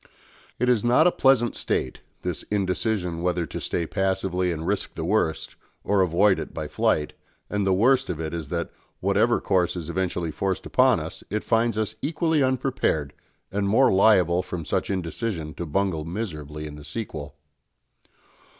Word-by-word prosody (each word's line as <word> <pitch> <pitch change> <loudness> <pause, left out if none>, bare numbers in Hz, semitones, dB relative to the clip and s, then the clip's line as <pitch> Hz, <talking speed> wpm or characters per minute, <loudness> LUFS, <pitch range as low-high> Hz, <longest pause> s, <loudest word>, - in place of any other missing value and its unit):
It 125 - 0
is 120 -4 +3
not 125 +7 +4
a 180 - +6
pleasant 130 -6 +3
state, 65 - -2 0.2
this - - -2
indecision 95 -3 -1
whether 90 -1 0
to - - -6
stay 85 - -1
passively 95 -1 0
and 80 -1 -4
risk 100 +3 -1
the - - -3
worst 80 -1 0 0.3
or 100 -1 +2
avoid 95 +3 +3
it - - -7
by - - -3
flight, 75 -1 0 0.4
and 105 -1 0
the 95 - +4
worst 130 +6 +3
of 80 - -3
it 80 0 -4
is 80 -3 -4
that, 85 -1 -3 0.3
whatever - - +2
course 90 -2 +1
is 85 -2 -5
eventually 90 -2 -1
forced 95 +3 -2
upon 130 -5 +4
us, 80 +3 -7
it 105 - -2
finds 115 -1 +1
us 110 -2 -2
equally 160 0 +1
unprepared, 130 - 0 0.4
and 100 0 0
more 130 +4 +4
liable 90 -3 +4
from 90 -3 -6
such - - -1
indecision 90 -3 -3
to 85 - -5
bungle 90 -1 0
miserably 75 -5 -5
in 75 -1 -8
the 75 - -11
sequel. 75 -9 -6
95 Hz, 170 wpm, -25 LUFS, 85-110 Hz, 0.4 s, a